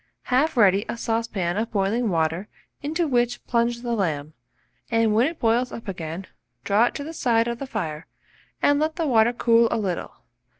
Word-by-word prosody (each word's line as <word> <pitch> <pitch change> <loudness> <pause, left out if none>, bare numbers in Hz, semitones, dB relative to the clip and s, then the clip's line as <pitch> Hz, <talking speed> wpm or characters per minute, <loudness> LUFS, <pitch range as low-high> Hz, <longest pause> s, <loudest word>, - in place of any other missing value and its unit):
Have 275 +2 +2
ready 200 -2 +5
a - - -3
saucepan 225 -6 -1
of 225 +2 -1
boiling 210 +3 0
water, 165 +2 0 0.3
into 315 +4 -1
which 245 -2 0
plunge 235 0 0
the 240 -1 -1
lamb, 155 -8 -2 0.6
and 225 -2 +2
when 230 +5 +4
it 325 +1 -5
boils 235 +2 +1
up 230 - -8
again, 170 -1 -5 0.4
draw 205 +4 +3
it - - -2
to 285 - -4
the 320 +3 -7
side 235 -6 +2
of 235 0 -3
the 275 - -5
fire, 165 -10 -4 0.6
and 285 0 +4
let 310 +1 0
the 330 - -1
water 235 -4 +4
cool 230 -1 +4
a - - 0
little. 190 -5 -3
230 Hz, 185 wpm, -24 LUFS, 195-245 Hz, 0.6 s, ready